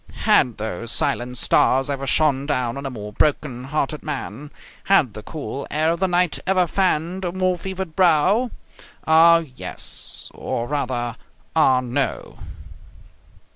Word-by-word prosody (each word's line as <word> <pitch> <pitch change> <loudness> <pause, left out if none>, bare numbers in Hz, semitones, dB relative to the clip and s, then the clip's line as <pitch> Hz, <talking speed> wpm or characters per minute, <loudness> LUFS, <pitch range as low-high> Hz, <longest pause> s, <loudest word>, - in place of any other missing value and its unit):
Had 120 -3 +3
those 110 +1 -4
silent 125 +1 -1
stars 130 +2 +3
ever 135 -1 -3
shone 140 -1 +2
down 125 -5 -1
on 140 0 -5
a - - -3
more 105 -4 -8
broken 130 -2 0
hearted 150 +1 -2
man? 145 -2 -6 0.4
Had 155 - +3
the 110 - -8
cool 140 +1 -6
air 155 +2 +1
of 170 - -2
the 190 - +2
night 175 -2 +1
ever 185 -1 +3
fanned 180 0 0
a 175 - -1
more 185 0 0
fevered 190 -2 -6
brow? 185 +7 +3 0.6
Ah, 165 +1 +6
yes! - - -4
Or, 120 0 -4
rather, 125 -4 -2 0.4
ah 130 -5 +4
no! 125 +2 -3
145 Hz, 140 wpm, -22 LUFS, 125-170 Hz, 0.6 s, Ah